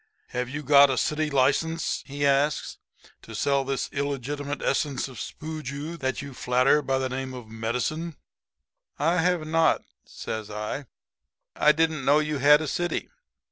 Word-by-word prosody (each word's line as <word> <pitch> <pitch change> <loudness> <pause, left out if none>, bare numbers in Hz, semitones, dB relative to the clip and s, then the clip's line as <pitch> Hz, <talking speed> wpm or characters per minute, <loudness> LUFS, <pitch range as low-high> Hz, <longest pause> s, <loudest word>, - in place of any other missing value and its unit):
"'Have 125 0 -3
you 145 +3 -5
got 140 0 +7
a 130 - 0
city 155 0 0
license,' 145 +4 +1
he 145 +1 -2
asks, 140 +2 +1 0.4
'to - - -10
sell 140 -1 +1
this 135 -1 -2
illegitimate 140 +1 -3
essence 140 -2 0
of 130 -3 -10
spooju 155 +1 -6
that 130 +1 -2
you 140 -1 -8
flatter 125 +4 +3
by 135 -1 0
the 130 0 0
name 130 0 -4
of 120 -3 -9
medicine?' 125 +9 -3 0.8
"'I 165 +5 +2
have 175 -1 +1
not,' 165 +1 +2 0.2
says 110 -1 -6
I. 105 +6 -4 0.7
'I 150 - +5
didn't 160 -2 +1
know 145 +3 +5
you 150 -1 0
had 150 +3 +6
a 155 - -3
city. 175 +5 -2
140 Hz, 155 wpm, -26 LUFS, 130-155 Hz, 0.8 s, got